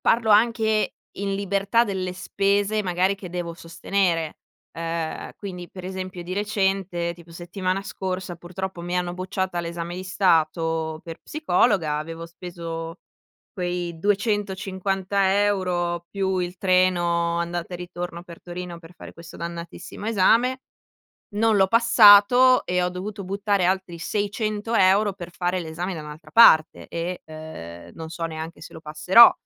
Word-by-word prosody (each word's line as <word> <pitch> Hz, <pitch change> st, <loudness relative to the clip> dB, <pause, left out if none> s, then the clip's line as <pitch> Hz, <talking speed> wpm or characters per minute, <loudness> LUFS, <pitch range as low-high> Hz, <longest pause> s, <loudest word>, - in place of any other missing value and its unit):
parlo 225 Hz, -1 st, +2 dB
anche 220 Hz, -1 st, +3 dB, 0.2 s
in 195 Hz, 0 st, -1 dB
libertà 200 Hz, +4 st, +1 dB
delle 185 Hz, -3 st, -3 dB
spese 200 Hz, +3 st, 0 dB
magari 185 Hz, +1 st, +1 dB
che 190 Hz, -3 st, -9 dB
devo 175 Hz, -1 st, -4 dB
sostenere. 170 Hz, -1 st, -1 dB, 0.3 s
Ehm, 165 Hz, -1 st, -4 dB
quindi 180 Hz, -3 st, -7 dB
per 185 Hz, -1 st, -10 dB
esempio 185 Hz, -1 st, -5 dB
di 175 Hz, +1 st, -6 dB
recente, 195 Hz, -4 st, -1 dB
tipo 170 Hz, -1 st, -16 dB
settimana 185 Hz, +3 st, -3 dB
scorsa 185 Hz, -2 st, -4 dB
purtroppo 185 Hz, +1 st, -6 dB
mi 175 Hz, +1 st, -2 dB
hanno 175 Hz, -1 st, -1 dB
bocciata 185 Hz, 0 st, -3 dB
all'esame 170 Hz, 0 st, -4 dB
di 185 Hz, +1 st, -6 dB
stato 165 Hz, -4 st, +1 dB
per 165 Hz, -1 st, -8 dB
psicologa, 180 Hz, -, +1 dB
avevo 165 Hz, +2 st, -6 dB
speso 165 Hz, -1 st, -7 dB, 0.5 s
quei 175 Hz, -3 st, -3 dB
250 195 Hz, -1 st, 0 dB
euro, 175 Hz, -4 st, -1 dB
più 190 Hz, -1 st, -1 dB
il 180 Hz, 0 st, -3 dB
treno 175 Hz, -3 st, +2 dB
andata 170 Hz, +1 st, -3 dB
e -, -, -3 dB
ritorno 175 Hz, -1 st, -6 dB
per 170 Hz, -2 st, -12 dB
Torino 175 Hz, -1 st, -7 dB
per 165 Hz, +1 st, -15 dB
fare -, -, -11 dB
questo 170 Hz, 0 st, -12 dB
dannatissimo 170 Hz, +4 st, -7 dB
esame. 230 Hz, +5 st, +3 dB, 0.8 s
Non 220 Hz, +1 st, +3 dB
l'ho 190 Hz, -1 st, +5 dB
passato 230 Hz, +2 st, +7 dB
e 180 Hz, 0 st, +1 dB
ho 180 Hz, -, +1 dB
dovuto 200 Hz, +3 st, -6 dB
buttare 200 Hz, 0 st, 0 dB
altri 185 Hz, -2 st, -1 dB
600 210 Hz, +4 st, -2 dB
euro 195 Hz, +1 st, +4 dB
per 175 Hz, -2 st, -9 dB
fare 180 Hz, +1 st, -1 dB
l'esame 170 Hz, +3 st, -4 dB
da 160 Hz, -, -6 dB
un'altra 150 Hz, +2 st, -11 dB
parte 160 Hz, -9 st, +6 dB
e, 170 Hz, +2 st, -4 dB
ehm, 155 Hz, -, -9 dB
non 160 Hz, -1 st, -7 dB
so 165 Hz, 0 st, -4 dB
neanche 160 Hz, +1 st, -7 dB
se 165 Hz, -, -11 dB
lo -, -, -9 dB
passerò. 170 Hz, +9 st, +7 dB
180 Hz, 145 wpm, -24 LUFS, 170-200 Hz, 0.8 s, passato